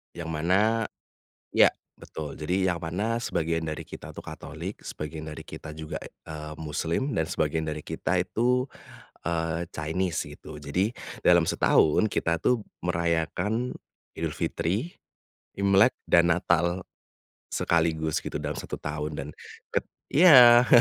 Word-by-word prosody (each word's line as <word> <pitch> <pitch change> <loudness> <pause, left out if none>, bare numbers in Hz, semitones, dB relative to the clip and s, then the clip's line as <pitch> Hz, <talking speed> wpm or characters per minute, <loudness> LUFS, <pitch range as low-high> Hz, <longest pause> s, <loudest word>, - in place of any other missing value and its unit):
Yang 85 -1 -5
mana 95 +8 +2 0.7
iya, - - +7 0.3
betul 75 -2 -7
jadi 90 +4 +1
yang 85 - -3
mana 100 +8 -1
sebagian 80 -6 -1
dari 75 - -4
kita - - -10
itu - - -8
katolik, - - -7
sebagian 75 +1 -6
dari 75 -2 -7
kita 75 -1 -9
juga, 80 0 -5
eee, 75 -1 -9
muslim 80 - -2
dan 80 -9 0
sebagian 80 +1 -1
dari 75 -1 -4
kita 80 +3 -2
itu, 125 +6 +1 0.6
eee, 80 0 -1
Chinese 80 +3 -2
gitu 75 - -11
jadi 90 +10 -1 0.3
dalam 85 -1 +7
setahun 80 +7 +4
kita, 85 -5 0
tuh, 115 +5 +2 0.2
merayakan 85 +8 0 0.4
Idul 80 -1 -2
Fitri, 90 - -2 0.6
Imlek 100 0 +5
dan 85 0 +5
Natal, 85 +1 +1 0.7
sekaligus 80 -2 +1
gitu - - -3
dalam - - -3
1 - - -5
tahun 75 +1 -3
dan 70 - -4 0.4
ket - - -1 0.3
iya, 125 -7 +9
85 Hz, 130 wpm, -27 LUFS, 80-100 Hz, 0.7 s, iya